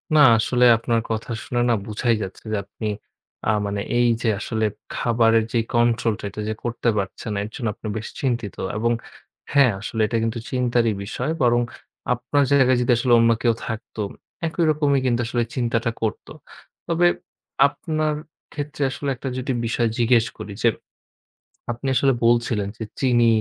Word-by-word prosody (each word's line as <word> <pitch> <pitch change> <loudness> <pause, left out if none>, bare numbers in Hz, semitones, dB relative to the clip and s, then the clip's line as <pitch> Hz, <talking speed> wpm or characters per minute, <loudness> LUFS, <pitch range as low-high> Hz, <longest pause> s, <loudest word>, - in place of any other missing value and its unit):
না - - +6 0.2
আসলে 125 +2 +2
আপনার 115 0 0
কথা 110 +1 -3
শুনে 120 -1 -1
না - - +4
বুঝাই 115 +2 +1
যাচ্ছে 95 0 -8
যে 110 - +1
আপনি, 110 - -6 0.6
আ - - +2 0.2
মানে 100 0 -2 0.2
এই 120 0 +4
যে 115 - 0
আসলে 110 0 -1 0.3
খাবারের 115 -1 +3
যেই 115 -2 +1
control 120 -1 +2
টা - - -11
এটা 105 +2 -6
যে - - 0
করতে 120 0 0
পারছেন 100 +2 -3
না 100 - -1
এর 105 - -6
জন্য 120 - -3
আপনি 110 - -8
বেশ 110 - -5
চিন্তিত 120 -6 -1 0.2
এবং 115 +2 +1 0.6
হ্যাঁ 140 -4 +6
আসলে 110 +2 -3
এটা 115 +2 -1
কিন্তু 115 +1 -1
চিন্তারই 120 -3 +2
বিষয়। 125 +8 -3
বরং 120 -1 +4 0.5
আপনার 130 +4 +1
জায়গায় 130 -3 +5
যদি 125 0 +2
আসলে 120 0 +2
অন্য 115 0 +5
কেউ 120 -2 +3
থাকতো 110 -1 -5 0.5
একই 165 +1 -1
রকমই 145 -2 +2
কিন্তু 120 -2 +2
আসলে 120 0 0
চিন্তাটা 115 -2 0
করতো। 110 -2 -3 0.6
তবে 170 +1 +3 0.6
আপনার 155 -2 -2 0.4
ক্ষেত্রে 145 0 -4
আসলে 140 0 -3
একটা 130 +2 -5
যদি 130 +1 -2
বিষয় 115 +1 +1
জিজ্ঞেস 120 -1 +4
করি 100 - -7
যে, - - +5 1.0
আপনি 120 +3 -4
আসলে 135 +2 +4
বলছিলেন 115 -3 +2
যে 110 - -3 0.2
চিনি 120 -3 +4
120 Hz, 165 wpm, -23 LUFS, 115-130 Hz, 1.0 s, না